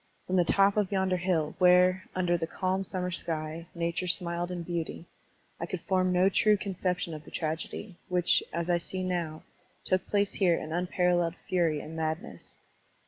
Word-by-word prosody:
From 185 Hz, -, -1 dB
the 180 Hz, -, +5 dB
top 195 Hz, +4 st, +3 dB
of 205 Hz, -2 st, +1 dB
yonder 190 Hz, -2 st, +1 dB
hill, 175 Hz, -4 st, 0 dB
where, 180 Hz, 0 st, +5 dB
under 180 Hz, -1 st, +2 dB
the 165 Hz, -1 st, -2 dB
calm 185 Hz, +2 st, -1 dB
summer 180 Hz, -1 st, -3 dB
sky, 160 Hz, 0 st, -3 dB
nature 170 Hz, +1 st, -1 dB
smiled 175 Hz, -1 st, -1 dB
in 175 Hz, -1 st, -4 dB
beauty, 170 Hz, -1 st, -4 dB, 0.5 s
I 170 Hz, -, -3 dB
could 180 Hz, -1 st, -4 dB
form 185 Hz, -1 st, +1 dB
no 180 Hz, +1 st, +4 dB
true 210 Hz, +2 st, +4 dB
conception 180 Hz, -3 st, -2 dB
of 155 Hz, -1 st, -7 dB
the -, -, -13 dB
tragedy, 170 Hz, +4 st, -4 dB
which, 180 Hz, -1 st, +3 dB
as 170 Hz, +1 st, -2 dB
I 175 Hz, -1 st, +2 dB
see 185 Hz, +2 st, -3 dB
now, 170 Hz, -4 st, -2 dB, 0.4 s
took 185 Hz, 0 st, +1 dB
place 205 Hz, -1 st, +1 dB
here 180 Hz, -4 st, +3 dB
in 155 Hz, -, -6 dB
tmparal 180 Hz, +1 st, +1 dB
leled 170 Hz, 0 st, -1 dB
fury 165 Hz, -5 st, +1 dB
and 160 Hz, -, -8 dB
madness. 160 Hz, +1 st, -4 dB
180 Hz, 180 wpm, -29 LUFS, 170-185 Hz, 0.5 s, the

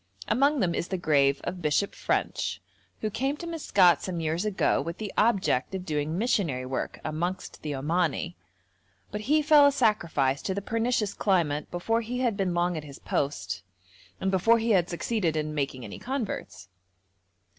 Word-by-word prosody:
Among 275 Hz, +4 st, +3 dB
them 175 Hz, -2 st, +1 dB
is 170 Hz, -, -2 dB
the 190 Hz, -, -2 dB
grave 140 Hz, -4 st, +2 dB
of 180 Hz, 0 st, -4 dB
Bishop 155 Hz, +6 st, +1 dB
French, -, -, -1 dB, 0.4 s
who 215 Hz, -, -1 dB
came 270 Hz, +7 st, -1 dB
to 340 Hz, -, -7 dB
Maskat 200 Hz, -, +3 dB
some 180 Hz, -3 st, -3 dB
years 165 Hz, +4 st, -1 dB
ago 210 Hz, -3 st, +1 dB
with 170 Hz, +1 st, -5 dB
the 210 Hz, -3 st, -5 dB
object 195 Hz, -, +2 dB
of 185 Hz, -1 st, -5 dB
doing 155 Hz, 0 st, -1 dB
missionary 180 Hz, -, 0 dB
work 130 Hz, 0 st, -3 dB
amongst 170 Hz, +4 st, -3 dB
the 150 Hz, -2 st, -3 dB
Omani, 170 Hz, +4 st, 0 dB, 0.8 s
but 210 Hz, -, -4 dB
he 300 Hz, +7 st, +2 dB
fell 295 Hz, -1 st, +7 dB
a -, -, +4 dB
sacrifice 170 Hz, -, +1 dB
to 190 Hz, -, -2 dB
the -, -, -1 dB
pernicious 230 Hz, -1 st, 0 dB
climate 160 Hz, -7 st, +1 dB
before 225 Hz, +7 st, 0 dB
he 240 Hz, +2 st, -4 dB
had 240 Hz, -5 st, +1 dB
been 190 Hz, -3 st, -1 dB
long 175 Hz, 0 st, +1 dB
at 155 Hz, -, -4 dB
his 140 Hz, -2 st, -10 dB
post, 95 Hz, -10 st, -2 dB, 0.6 s
and 190 Hz, -, 0 dB
before 210 Hz, +5 st, +4 dB
he 230 Hz, 0 st, 0 dB
had 180 Hz, -4 st, +3 dB
succeeded 175 Hz, -2 st, -1 dB
in 155 Hz, 0 st, -2 dB
making 135 Hz, -4 st, -2 dB
any 100 Hz, -, -8 dB
converts. 210 Hz, -, -4 dB
180 Hz, 175 wpm, -27 LUFS, 150-220 Hz, 0.8 s, fell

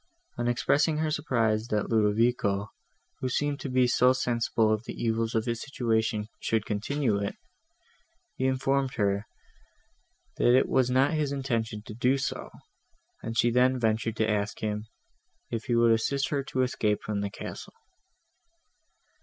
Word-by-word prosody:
On 120 Hz, -, -2 dB
expressing 145 Hz, +6 st, +2 dB
her 155 Hz, 0 st, 0 dB
surprise, 115 Hz, -7 st, 0 dB
that 105 Hz, -2 st, -1 dB
Ludovico, 105 Hz, -1 st, +1 dB, 0.5 s
who 130 Hz, -, -2 dB
seemed 145 Hz, +2 st, -1 dB
to 140 Hz, -, -5 dB
be 130 Hz, 0 st, +3 dB
so 125 Hz, +1 st, +4 dB
sensible 115 Hz, -3 st, +1 dB
of 110 Hz, +1 st, -2 dB
the -, -, -6 dB
evils 115 Hz, 0 st, -1 dB
of 110 Hz, 0 st, +1 dB
his 115 Hz, -1 st, -2 dB
situation, 110 Hz, -6 st, -1 dB
should 110 Hz, -2 st, 0 dB
continue 110 Hz, +1 st, 0 dB
in 100 Hz, -, -1 dB
it, -, -, -4 dB, 1.0 s
he 130 Hz, -, 0 dB
informed 135 Hz, 0 st, 0 dB
her, 100 Hz, 0 st, 0 dB, 1.1 s
that 120 Hz, +1 st, +5 dB
it -, -, +3 dB
was 130 Hz, -1 st, +2 dB
not 130 Hz, +5 st, +3 dB
his 150 Hz, -3 st, 0 dB
intention 115 Hz, -6 st, -2 dB
to -, -, -8 dB
do 125 Hz, +4 st, +2 dB
so, 135 Hz, -, -4 dB, 0.7 s
and 115 Hz, -, -5 dB
she 120 Hz, +1 st, +3 dB
then 125 Hz, +2 st, +3 dB
ventured 110 Hz, -1 st, 0 dB
to 110 Hz, -1 st, +1 dB
ask 105 Hz, -1 st, -1 dB
him, 105 Hz, 0 st, -2 dB, 0.6 s
if 115 Hz, -2 st, -3 dB
he 120 Hz, -, 0 dB
would 115 Hz, 0 st, +5 dB
assist 135 Hz, +5 st, +1 dB
her 145 Hz, -2 st, 0 dB
to 130 Hz, -1 st, 0 dB
escape 105 Hz, -4 st, 0 dB
from 105 Hz, -1 st, -2 dB
the 100 Hz, -, -2 dB
castle. 100 Hz, -, -8 dB
115 Hz, 160 wpm, -28 LUFS, 110-130 Hz, 1.1 s, that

